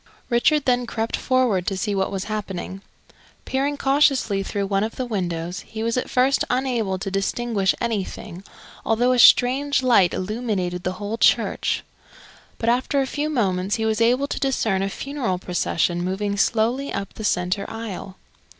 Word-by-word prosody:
Richard 285 Hz, +5 st, +3 dB
then 245 Hz, -1 st, +1 dB
crept 225 Hz, -1 st, -2 dB
forward 245 Hz, -9 st, +1 dB
to 195 Hz, -, -1 dB
see 205 Hz, +2 st, -1 dB
what 190 Hz, -1 st, 0 dB
was 195 Hz, -1 st, -3 dB
happening. 195 Hz, -3 st, -5 dB, 0.6 s
Peering 280 Hz, +2 st, -1 dB
cautiously 270 Hz, -7 st, +2 dB
through 200 Hz, +1 st, -2 dB
one 195 Hz, 0 st, 0 dB
of 220 Hz, -, -4 dB
the 255 Hz, -, -3 dB
windows, 180 Hz, -6 st, -3 dB
he 220 Hz, 0 st, -7 dB
was 230 Hz, 0 st, 0 dB
at 250 Hz, -, -2 dB
first 260 Hz, +2 st, +2 dB
unable 245 Hz, -7 st, 0 dB
to 195 Hz, +1 st, -5 dB
distinguish 195 Hz, 0 st, 0 dB
anything, 195 Hz, -5 st, -4 dB, 0.4 s
although 240 Hz, +3 st, +2 dB
a 250 Hz, -, +2 dB
strange 265 Hz, +4 st, +5 dB
light 215 Hz, -8 st, +5 dB
illuminated 190 Hz, -4 st, -2 dB
the 185 Hz, +1 st, -2 dB
whole 205 Hz, +4 st, -5 dB
church. -, -, +2 dB, 0.7 s
But 230 Hz, -, -3 dB
after 255 Hz, +3 st, +1 dB
a 270 Hz, -, +2 dB
few 295 Hz, +3 st, -2 dB
moments 195 Hz, -8 st, 0 dB
he 220 Hz, -, -2 dB
was 220 Hz, 0 st, 0 dB
able 250 Hz, +4 st, +3 dB
to -, -, -3 dB
discern 225 Hz, -8 st, 0 dB
a 195 Hz, -, -1 dB
funeral 260 Hz, -5 st, -3 dB
procession 175 Hz, -1 st, -1 dB
moving 200 Hz, +2 st, -2 dB
slowly 235 Hz, +6 st, +1 dB
up 200 Hz, -1 st, -4 dB
the 215 Hz, -, -8 dB
centre 185 Hz, 0 st, 0 dB
aisle. 215 Hz, -4 st, -6 dB
220 Hz, 165 wpm, -23 LUFS, 195-250 Hz, 0.7 s, strange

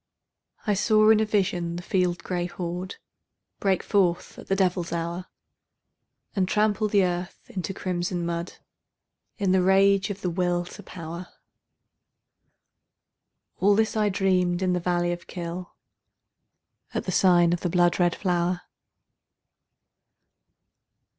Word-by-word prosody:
I 210 Hz, -, +2 dB
saw 215 Hz, +2 st, +4 dB
in 220 Hz, -, +5 dB
a 220 Hz, -, +2 dB
vision 180 Hz, -5 st, 0 dB
the 175 Hz, -, -6 dB
field 180 Hz, -2 st, 0 dB
gray 175 Hz, -1 st, -2 dB
horde 180 Hz, +1 st, -5 dB, 0.6 s
Break 195 Hz, -2 st, +1 dB
forth 180 Hz, -4 st, 0 dB
at -, -, -11 dB
the 195 Hz, -, +1 dB
devil's 180 Hz, -3 st, 0 dB
hour, 170 Hz, +2 st, -3 dB, 1.1 s
And 190 Hz, -2 st, +1 dB
trample 215 Hz, +1 st, +2 dB
the 205 Hz, -2 st, +3 dB
earth 180 Hz, 0 st, -3 dB
into 185 Hz, 0 st, -3 dB
crimson 175 Hz, -2 st, -2 dB
mud 170 Hz, +1 st, -3 dB, 0.8 s
In 200 Hz, -4 st, +1 dB
the 190 Hz, 0 st, +4 dB
rage 195 Hz, +1 st, +4 dB
of 200 Hz, -1 st, -5 dB
the 180 Hz, -, -1 dB
Will 175 Hz, 0 st, 0 dB
to -, -, -10 dB
Power, 170 Hz, +1 st, -8 dB, 2.3 s
All 200 Hz, +2 st, +4 dB
this 220 Hz, +1 st, +1 dB
I 210 Hz, -1 st, +2 dB
dreamed 185 Hz, -2 st, +1 dB
in 180 Hz, -1 st, +2 dB
the 180 Hz, -, +1 dB
valley 175 Hz, 0 st, 0 dB
of 175 Hz, 0 st, -6 dB
Kyll, 175 Hz, +1 st, -6 dB, 1.2 s
At -, -, -1 dB
the 185 Hz, -, -3 dB
sign 175 Hz, -2 st, +4 dB
of 175 Hz, -, -1 dB
the 175 Hz, -, -2 dB
blood 175 Hz, +1 st, +2 dB
red 175 Hz, -1 st, +3 dB
flower. 180 Hz, -1 st, 0 dB
180 Hz, 135 wpm, -26 LUFS, 175-195 Hz, 2.3 s, in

